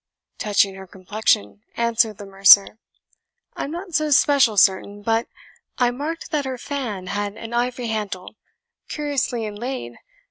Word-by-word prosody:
"Touching 200 -2 +2
her 190 0 -11
complexion," 180 - -1 0.2
answered 230 -2 +1
the 205 - -9
mercer, 195 +2 +6 0.8
"I - - -3
am - - -6
not 350 +2 -7
so 310 0 +1
special 275 -6 +4
certain, 200 +2 +2
but 225 +2 0 0.5
I 245 -1 +2
marked 300 +6 -5
that 295 -3 -1
her 260 -1 -4
fan 240 -8 -5
had 205 +2 -3
an 230 +1 -8
ivory 245 +1 -1
handle, 205 -4 -4 0.6
curiously 280 -6 -2
inlaid. 210 - -6
225 Hz, 140 wpm, -22 LUFS, 200-260 Hz, 0.8 s, mercer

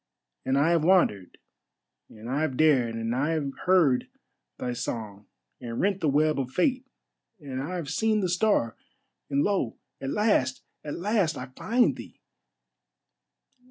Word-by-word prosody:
And 135 +1 +1
I 150 +4 +3
have 170 -2 +2
wandered, 160 - +2 0.7
and 110 +1 -11
I 135 +4 -1
have 135 -5 -1
dared, 130 -7 +3
and 115 0 -2
I 145 +5 0
have 145 -4 -2 0.2
heard 165 -9 +4 0.5
thy 125 -1 -3
song, 105 -4 -5 0.3
and 115 -2 -5
rent 195 -1 +1
the 155 - +2
web 150 +1 +2
of 130 -2 -2
Fate, 255 - 0 0.5
and 135 -4 -5
I 170 +7 -4
have 170 -5 -4
seen 215 +7 +1
the 185 - 0
Star, 180 - +1 0.5
and 140 0 +1
lo! 195 - 0 0.2
at 135 - -3
last, 140 -10 +1 0.2
at 150 - -5
last! 190 -5 0
I 130 0 -7
find 240 +3 +2
thee. - - -11
145 Hz, 155 wpm, -27 LUFS, 125-185 Hz, 0.7 s, heard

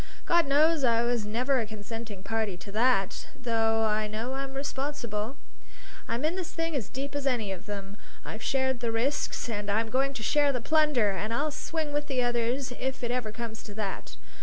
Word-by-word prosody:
God 340 -3 +4
knows 300 +2 +4
I 235 -2 +4
was 235 -3 +1
never 250 +5 +2
a 225 - 0
consenting 215 -1 -7
party 220 -4 -1
to 180 +3 -9
that, 215 -3 +2
though 225 -2 +2
I 215 0 +2
know 220 +5 -3
I'm 270 0 -4
responsible. 270 -4 -2 0.7
I'm 235 +5 0
in 325 +3 +1
this 370 -3 -3
thing 330 -1 -1
as 240 -8 -2
deep 275 +2 -4
as 285 -1 -1
any 230 -7 +1
of 190 +2 -6
them. 200 -1 -5 0.3
I've 220 - -6
shared 265 -2 +1
the 235 -1 0
risks 250 +6 0
and 210 -3 -3
I'm 220 +2 +1
going 275 +2 +2
to 220 - -4
share 290 +3 +4
the 255 - -1
plunder, 295 -6 +3
and 210 +3 -2
I'll 290 +6 +1
swing 310 0 -2
with 290 0 0
the 260 -3 +1
others 245 +2 0
if 265 -1 -2
it 240 - 0
ever 245 -4 -1
comes 225 -1 -5
to 205 - -10
that. 205 -3 -4
240 Hz, 200 wpm, -29 LUFS, 220-275 Hz, 0.7 s, God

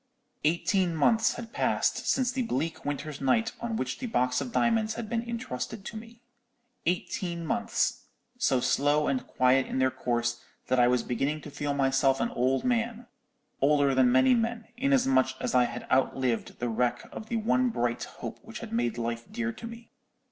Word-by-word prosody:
"Eighteen 170 +3 +1
months 220 +9 +3
had 230 -1 -8
passed - - 0
since 255 -2 +2
the 255 0 -2
bleak 160 - -2
winter's 145 0 -4
night 225 - +2
on 235 -1 -2
which - - -3
the 255 - -3
box 125 - +1
of 245 - -5
diamonds 225 -2 +1
had 230 -1 -5
been 230 +1 -1
intrusted 220 - -5
to - - -7
me; 230 +2 -10 0.6
eighteen 175 -1 -2
months, 235 +5 0 0.3
so 190 - +2
slow 145 +4 +2
and 130 -2 -1
quiet 130 +1 +3
in - - -3
their 130 0 +3
course 120 -2 -1 0.3
that 130 0 +3
I 120 - +6
was 125 0 +2
beginning 140 +5 -1
to 150 - -9
feel 145 0 -2
myself 135 0 +2
an - - 0
old 130 +2 +1
man, 235 -1 0 0.6
older 140 0 +4
than 130 -1 +4
many 130 - +5
old 245 - +5
men, 230 0 -3
inasmuch 135 - +2
as - - -2
I 125 -1 +5
had - - -6
outlived 130 -2 +1
the 120 - -2
wreck 120 +1 -1
of 220 - -8
the 235 - 0
one 245 +3 +2
bright 120 - -1
hope - - -8
which - - -9
had - - -8
made 120 0 0
life 115 0 -4
dear 115 0 -2
to 230 - -8
me. 230 0 -11
150 Hz, 185 wpm, -28 LUFS, -, 0.6 s, I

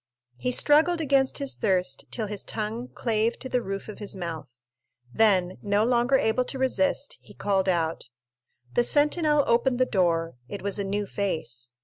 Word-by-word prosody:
He 250 - -1
struggled 315 +6 +4
against 275 -3 +2
his 280 -2 -2
thirst 180 -9 0
till 225 - -3
his 210 -1 -5
tongue 225 +3 -4
clave 225 -1 0
to - - -6
the 250 -1 0
roof 195 -2 -5
of 215 - -9
his 205 -2 -5
mouth; 165 -5 -5 0.7
then, 185 -5 +3
no 205 +1 +2
longer 245 +2 +3
able 225 +1 +1
to 270 - -5
resist, 275 +2 0
he 205 - -16
called 195 -2 0
out. 165 -7 -1 0.6
The 240 - +3
sentinel 295 +2 +3
opened 245 +2 +2
the 255 - +3
door; 165 - 0
it 200 - -6
was 200 0 -2
a - - 0
new 205 +1 -2
face. 125 - -4
215 Hz, 170 wpm, -26 LUFS, 190-255 Hz, 0.7 s, struggled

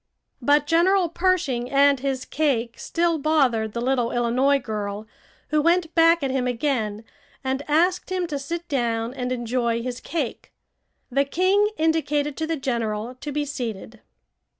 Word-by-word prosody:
But 290 +3 +3
General 345 +3 +3
Pershing 330 -9 0
and 280 0 +4
his 265 -1 -2
cake 245 -7 -1
still 335 -1 0
bothered 260 -8 +1
the 235 - -3
little 245 -2 +1
Illinois 250 +4 +2
girl, 210 -4 -4 0.4
who 305 0 +2
went 335 +1 +2
back 330 -1 +5
at 270 - 0
him 260 -1 0
again 230 -4 -1 0.4
and 265 +1 -1
asked 355 +5 +2
him 365 -1 0
to 295 -4 -4
sit 335 +5 -5
down 235 -3 -1
and 250 -1 -3
enjoy 235 -1 -1
his 250 0 -4
cake. 300 -8 -4 0.6
The 275 +3 +2
king 375 +7 +2
indicated 300 -2 0
to 320 - -2
the 325 0 -1
general 235 -3 -2
to 295 - -4
be 295 +1 -1
seated. 230 -5 -6
275 Hz, 150 wpm, -24 LUFS, 240-320 Hz, 0.6 s, back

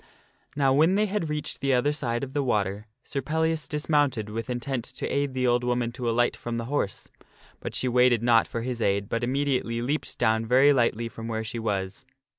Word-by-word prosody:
Now 135 -2 +3
when 160 +7 +4
they 210 +1 +3
had 195 -6 -2
reached 150 -2 -3
the 135 -1 +2
other 145 +4 +2
side 120 -4 -2
of 135 -1 -6
the 145 - +1
water, 105 -4 -1 0.2
Sir 140 - -3
Pellias 160 +3 -1
dis 150 -1 -4
mounted 135 -9 +1
with 115 +1 -4
intent 125 0 -2
to - - -6
aid 140 -1 -1
the 130 0 0
old 120 0 +2
woman 120 -1 0
to 120 -1 -3
alight 120 +1 +2
from 120 0 -5
the 115 - -3
horse. 125 -7 -2 0.5
But - - -6
she 130 - +1
waited 125 -2 +3
not 115 -2 +4
for 115 - -4
his 120 -1 -3
aid, 100 -1 +1
but 115 +1 -1
immediately 130 -2 0
leaped 140 +6 -2
down 110 -2 +2
very 135 +4 +6
lightly 120 -3 +1
from 115 0 -8
where 110 -1 -2
she 115 +2 -5
was. 105 +2 -3
125 Hz, 215 wpm, -26 LUFS, 115-140 Hz, 0.5 s, very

